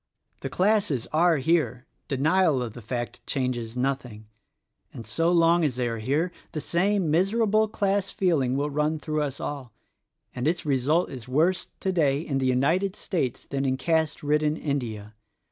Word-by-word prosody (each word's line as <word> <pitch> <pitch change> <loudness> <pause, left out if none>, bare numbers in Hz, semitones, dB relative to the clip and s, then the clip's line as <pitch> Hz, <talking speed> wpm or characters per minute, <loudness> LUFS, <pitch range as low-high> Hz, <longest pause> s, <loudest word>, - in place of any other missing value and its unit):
The - - -5
classes 185 - +1
are 165 +1 +4
here 135 -4 0
— - - -47
denial 150 0 +2
of 115 -3 -6
the 120 - -10
fact 120 +2 -5
changes 125 -3 -2
nothing 125 -5 -2 0.4
— - - -52
and 115 - -8
so 165 +1 +1
long 170 0 +4
as 140 -6 0
they 125 -1 -1
are 115 -1 -3
here, 145 +10 0 0.2
the* 155 - -2
same 180 +1 +1
miserable 215 +5 +2
class 200 -2 0
feeling 140 -9 +1
will 145 +1 -1
run 150 +2 0
through 155 0 -2
us 140 -2 -3
all; 135 -6 -5 0.6
and 125 +3 -2
its 170 +1 0
result 145 +5 +1
is 130 -2 -8
worse, 160 +8 +1
today, 155 -8 +1
in 140 -4 -2
the 130 - +1
United 165 +10 +1
States 160 - -2
than 135 0 -3
in 130 -1 0
caste 160 +2 0
ridden 150 +1 +1
India. 115 -9 -3
150 Hz, 170 wpm, -26 LUFS, 130-170 Hz, 0.6 s, are